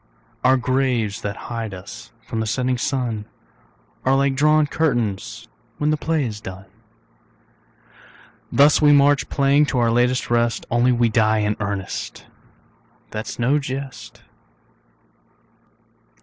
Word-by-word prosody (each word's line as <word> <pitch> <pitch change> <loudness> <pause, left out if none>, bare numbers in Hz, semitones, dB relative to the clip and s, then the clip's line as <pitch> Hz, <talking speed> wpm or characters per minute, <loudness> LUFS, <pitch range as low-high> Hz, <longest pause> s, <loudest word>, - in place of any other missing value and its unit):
Our 130 +1 +5
graves 125 -5 0
that 100 -1 -4 0.2
hide 115 -4 -4
us 115 +5 -10 0.2
from 115 - -4
the 110 - -2
setting 125 +2 -1
sun 120 -6 -2 0.8
Are 130 +1 +3
like 135 0 +2
drawn 150 +2 +3
curtains 120 -10 -2 0.3
when 150 +1 +1
the - - +2
play 155 -1 -1
is 105 -3 -6
done. 95 0 -9 1.9
Thus 145 +5 +5
march 145 -1 +5
we, - - -31
playing, 140 +1 +3
to 135 - -2
our 120 -1 +2
latest 125 +1 +1
rest, 120 0 +1
Only 120 +2 +3
we 120 -1 +2
die 110 -1 +2
in 105 0 0
earnest, 100 -2 -5 0.9
that's 110 0 -5
no 130 +5 +2
jest. 135 -1 -7
125 Hz, 125 wpm, -21 LUFS, 110-140 Hz, 1.9 s, Our